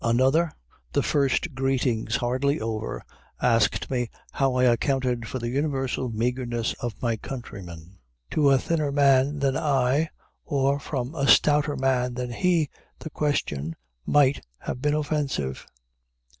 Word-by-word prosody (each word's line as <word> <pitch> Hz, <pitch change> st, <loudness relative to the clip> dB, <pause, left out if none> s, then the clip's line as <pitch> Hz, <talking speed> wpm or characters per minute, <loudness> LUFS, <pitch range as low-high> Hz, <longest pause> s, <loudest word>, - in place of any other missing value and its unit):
Another, 130 Hz, +8 st, +3 dB, 0.4 s
the -, -, +2 dB
first 145 Hz, +3 st, +1 dB
greetings 130 Hz, -4 st, 0 dB
hardly 130 Hz, +4 st, 0 dB
over, 110 Hz, 0 st, -4 dB, 0.4 s
asked 115 Hz, -2 st, +2 dB
me 120 Hz, -3 st, -1 dB, 0.2 s
how 135 Hz, -2 st, +1 dB
I 125 Hz, -, +2 dB
accounted 125 Hz, -1 st, +1 dB
for -, -, -4 dB
the 120 Hz, -1 st, -3 dB
universal 135 Hz, -2 st, -1 dB
meagerness 120 Hz, 0 st, -1 dB
of 120 Hz, -4 st, -5 dB
my 115 Hz, -2 st, +1 dB
countrymen. 95 Hz, -8 st, -9 dB, 0.3 s
To 145 Hz, -2 st, +3 dB
a 135 Hz, -, +6 dB
thinner 155 Hz, 0 st, -1 dB
man 140 Hz, 0 st, +4 dB
than 135 Hz, -2 st, +1 dB
I, 140 Hz, +2 st, +2 dB, 0.3 s
or 140 Hz, 0 st, +1 dB
from 135 Hz, -1 st, -4 dB
a 140 Hz, -4 st, -1 dB
stouter 145 Hz, 0 st, +4 dB
man 130 Hz, -2 st, 0 dB
than 125 Hz, -1 st, -3 dB
he, 165 Hz, +2 st, +1 dB, 0.3 s
the 160 Hz, -, -8 dB
question 80 Hz, -, -1 dB, 0.3 s
might 140 Hz, -2 st, +3 dB, 0.2 s
have 125 Hz, -, -5 dB
been 150 Hz, +1 st, +2 dB
offensive. 145 Hz, -, -2 dB
130 Hz, 135 wpm, -25 LUFS, 120-145 Hz, 0.4 s, a